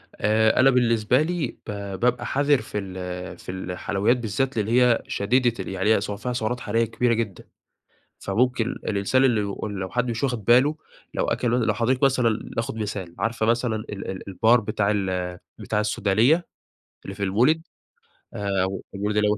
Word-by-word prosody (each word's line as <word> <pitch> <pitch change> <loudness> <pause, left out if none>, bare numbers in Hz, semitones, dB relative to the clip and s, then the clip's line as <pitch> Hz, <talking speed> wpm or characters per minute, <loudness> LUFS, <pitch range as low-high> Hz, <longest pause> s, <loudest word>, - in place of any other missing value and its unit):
آآ 110 +2 +2
أنا 130 +1 +7
بالنسبة 120 -1 +3
لي، 165 -2 -1 0.2
ب - - -3 0.3
بابقى 120 0 +1
حذِر 140 0 +2
في - - -6
ال 90 -2 -5
في - - -8
الحلويات 95 +5 -1
بالذات، 125 +3 -2
لإن 105 -2 0
هي 120 0 +4
شديدة 120 +4 +1
ال - - -11
يعني 95 +3 +2
هي - - 0
فيها 105 +4 -4
سعرات 120 +1 -2
حرارية 115 +1 0
كبيرة 115 +1 +1
جدًا. 110 -4 -3 0.8
فممكن 115 +3 +1
الإنسان 110 +5 0
اللي 120 -5 +3 0.4
لو 95 0 -4
حد 125 +3 -1
مش 115 +1 -3
واخد 120 -6 -1
باله، 130 +7 +5 0.4
لو - - 0
أكَل 125 - -1
لو 115 -2 +2
حضرتِك 125 +5 0
مثلًا 125 -5 +2
ناخد 115 0 -2
مثال، 100 -5 -5
عارفة 115 -1 0
مثلًا 115 0 +1
ال 105 -2 -6
ال 95 - -8
البار 110 +5 +4
بتاع 105 -1 0
ال 90 -3 -2 0.2
بتاع 105 - -2
السودانية؟ 110 - +2 0.6
اللي 95 - -6
في 100 - -6
المولد، 125 +12 +2 0.7
آآ 100 -1 -3 0.5
المولد 105 +1 0
115 Hz, 160 wpm, -24 LUFS, 100-125 Hz, 0.8 s, أنا